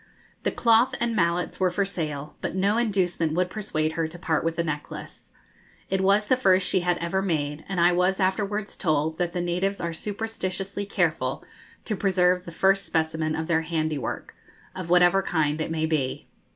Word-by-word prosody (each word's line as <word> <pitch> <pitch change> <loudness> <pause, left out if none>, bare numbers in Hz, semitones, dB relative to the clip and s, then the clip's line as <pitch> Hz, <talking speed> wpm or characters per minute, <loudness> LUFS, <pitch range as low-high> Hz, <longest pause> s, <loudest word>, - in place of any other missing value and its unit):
The - - 0
cloth 230 +1 +3
and 235 -1 0
mallets 170 -2 0
were 185 -1 +3
for 195 +3 0
sale, 150 -6 -4
but - - -3
no 200 +3 +2
inducement 185 -8 +1
would 180 +2 0
persuade 155 -8 -1
her 160 0 -1
to 165 +2 -10
part 165 -2 0
with 165 0 -1
the 170 - 0
necklace. 150 -2 -6 0.6
It 190 0 +1
was 200 +2 +3
the 255 - +3
first 190 -7 +3
she 185 - +2
had 175 0 +1
ever 170 +3 -1
made, 155 -5 -2
and 195 -2 -1
I 175 +1 +5
was 180 +2 +2
afterwards 200 +2 -1
told 155 -1 0
that 175 -1 0
the 180 - -1
natives 180 +3 -1
are 170 -1 -3
superstitiously 200 0 -4
careful 155 -8 0 0.4
to 215 - -1
preserve 180 -2 +2
the 170 - -7
first 195 +3 +3
specimen 160 -1 0
of 160 - -2
their 165 -1 +2
handiwork, 155 -3 -3 0.4
of 185 -2 -6
whatever 180 +2 +5
kind 155 -4 0
it 155 - -2
may 160 -1 0
be. 150 -5 -1
175 Hz, 185 wpm, -25 LUFS, 160-195 Hz, 0.6 s, I